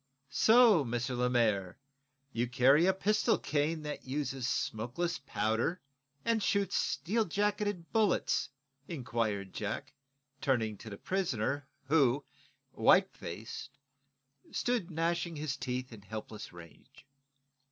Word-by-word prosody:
"So, 225 -4 +6
M. 120 -2 -1
Lemaire, 120 -7 +1 0.6
you 120 +2 0
carry 135 +7 +5
a - - +6
pistol 210 +3 +2
cane, 155 +2 -1
that 150 0 -5
uses 135 -2 -2
smokeless 130 +9 -2
powder 120 +5 0 0.5
and 230 -1 +2
shoots 200 -1 +1
steel 220 +6 +1
jacketed 205 -2 -1
bullets?" 215 -9 +2 0.4
inquired 110 - -2
Jack, - - -4 0.5
turning 115 -6 +1
to 110 - -9
the 100 - -7
prisoner, 145 - -1 0.2
who, 140 -2 +3 0.5
white - - +4
faced, 110 +8 -7 0.7
stood 240 -8 0
gnashing 170 0 -1
hi's 145 -2 -2
teeth 125 -1 -4
in 110 - -11
helpless 110 +1 -7
rage. 85 - -15
140 Hz, 110 wpm, -32 LUFS, 115-175 Hz, 0.7 s, So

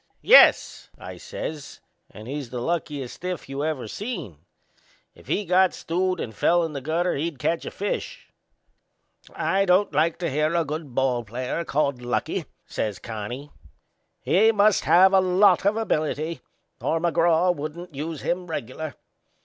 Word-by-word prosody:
"Yes," - - +6
I - - -9
says; 160 - -7 0.3
"and 110 +2 -12
he's 140 -2 -5
the 125 - -5
luckiest 145 -3 -3
stiff 180 -2 -5
you 135 +1 -4
ever 150 -7 -2
seen! 195 - -6 0.7
If - - -19
he 205 - -1
got 185 +1 +3
stewed 185 +1 -1
and 110 - -5
fell 175 - +2
in 160 -2 -4
the 140 - -5
gutter 165 +6 0
he'd 155 +1 -3
catch 165 +6 -1
a - - -2
fish." 205 - -4 1.1
"I 195 +1 +1
don't 185 +2 +3
like 165 +1 +2
to 170 -2 -2
hear 150 +4 0
a 170 -1 +2
good 150 -3 -6
ball 130 -3 +1
player 125 +8 -4
called 140 -5 -1
lucky," 120 0 -2 0.2
says 105 -3 -3
Connie. 115 +6 -7 0.7
"He 220 +5 +4
must 210 -1 +3
have 190 +3 +6
a 190 - +6
lot 185 +2 +4
of 210 +2 +2
ability 155 -6 -2 0.4
or 165 - 0
McGraw 170 +1 +2
wouldn't 155 +3 -7
use 150 +2 -5
him 180 +1 -2
regular. 155 0 -5
160 Hz, 155 wpm, -24 LUFS, 140-180 Hz, 1.1 s, Yes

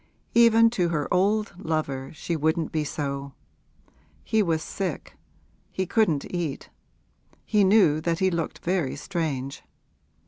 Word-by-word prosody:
Even 230 -1 +6
to 180 -7 0
her 150 -4 -1
old 205 +4 +2
lover 140 -4 -2
she 170 - -3
wouldn't 160 +1 0
be 155 -1 0
so! 140 -2 -4 0.9
He 220 - +2
was 165 -5 0
sick; 185 -6 -5 0.6
he 190 - -2
couldn't 175 -9 +1
eat; 170 -6 -4 0.7
he 210 -2 +3
knew 190 -6 +4
that 165 0 0
he 190 +1 +2
looked 170 -2 -4
very 175 -6 0
strange. 145 -7 -3
170 Hz, 130 wpm, -25 LUFS, 150-195 Hz, 0.9 s, Even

